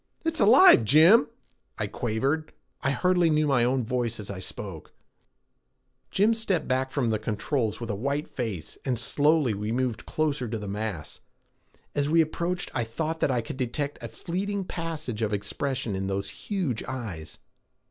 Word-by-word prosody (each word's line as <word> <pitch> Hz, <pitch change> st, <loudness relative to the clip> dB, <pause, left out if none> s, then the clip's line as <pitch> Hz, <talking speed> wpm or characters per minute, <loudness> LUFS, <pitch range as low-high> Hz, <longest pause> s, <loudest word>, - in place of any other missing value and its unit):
"It's 325 Hz, 0 st, 0 dB
alive, 245 Hz, -, +8 dB
Jim," 155 Hz, -, +6 dB, 0.5 s
I -, -, -1 dB
quavered. 135 Hz, +7 st, -2 dB, 0.3 s
I -, -, +1 dB
hardly 180 Hz, +3 st, +2 dB
knew 155 Hz, 0 st, +3 dB
my 135 Hz, -5 st, +3 dB
own 125 Hz, +1 st, +1 dB
voice 120 Hz, -1 st, -2 dB
as 100 Hz, -1 st, -6 dB
I 95 Hz, -, -6 dB
spoke. 95 Hz, -3 st, -7 dB, 1.2 s
Jim 210 Hz, +4 st, +3 dB
stepped 200 Hz, -7 st, -1 dB
back 130 Hz, 0 st, 0 dB
to 140 Hz, -4 st, +1 dB
the 110 Hz, -2 st, 0 dB
controls 110 Hz, +1 st, -1 dB
with 115 Hz, -2 st, -4 dB
a -, -, -2 dB
white 140 Hz, +7 st, -2 dB
face, 105 Hz, -, -5 dB
and 130 Hz, -3 st, 0 dB
slowly 145 Hz, +2 st, +2 dB
we 105 Hz, +2 st, -3 dB
moved 125 Hz, -2 st, -2 dB
closer 150 Hz, -5 st, 0 dB
to 115 Hz, +1 st, -3 dB
the 105 Hz, -1 st, -6 dB
mass. 100 Hz, -6 st, -4 dB, 0.7 s
As 145 Hz, 0 st, 0 dB
we 165 Hz, +2 st, +4 dB
approached 170 Hz, +3 st, -2 dB
I 120 Hz, -, 0 dB
thought 155 Hz, +8 st, -3 dB
that -, -, +2 dB
I 125 Hz, -2 st, +1 dB
could 115 Hz, -, -7 dB
detect 140 Hz, +3 st, -3 dB
a -, -, -5 dB
fleeting 195 Hz, +3 st, -3 dB
passage 155 Hz, -10 st, -4 dB
of 105 Hz, -1 st, 0 dB
expression 110 Hz, +3 st, -2 dB
in 95 Hz, 0 st, -2 dB
those 100 Hz, 0 st, -2 dB
huge 160 Hz, -, -3 dB
eyes. 100 Hz, -, -6 dB
130 Hz, 170 wpm, -27 LUFS, 110-155 Hz, 1.2 s, alive